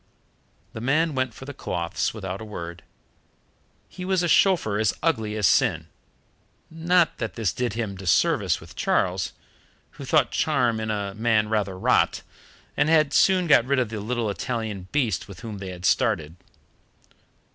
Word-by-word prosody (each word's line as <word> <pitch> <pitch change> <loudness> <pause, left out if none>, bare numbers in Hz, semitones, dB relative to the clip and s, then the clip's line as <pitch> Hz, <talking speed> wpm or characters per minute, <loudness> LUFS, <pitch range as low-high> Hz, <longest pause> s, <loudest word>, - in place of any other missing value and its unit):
The 110 - -7
man 155 +6 +1
went 130 -2 -1
for 135 - -10
the 145 - -7
cloths 85 -8 -2
without 95 -2 -6
a - - -6
word. 85 -5 -7 1.1
He 180 - -9
was 185 -1 +1
a - - +1
chauffeur 165 - +3
as 110 -2 +1
ugly 110 -10 0
as 105 -2 0
sin 85 - +2 0.8
not 170 +1 +2
that - - -4
this 110 -6 -1
did 125 -4 -2
him 110 -4 -4
disservice 90 -2 +2
with - - -14
Charles, 90 0 0 0.6
who - - -11
thought - - +2
charm 125 -7 +1
in 110 0 -3
a 100 -2 -2
man 110 0 +1
rather 100 -4 -1
rot, - - +2 0.5
and 145 - +2
had 155 -3 +3
soon 185 -2 +4
got 140 -7 +5
rid 140 +2 +1
of 125 -4 +1
the 110 -1 -5
little 115 0 -2
Italian 110 -4 -4
beast 120 - 0
with 100 -4 -11
whom 110 -4 -7
they 95 -1 -6
had 90 0 -7
started. 85 - +1
110 Hz, 165 wpm, -24 LUFS, 100-140 Hz, 1.1 s, got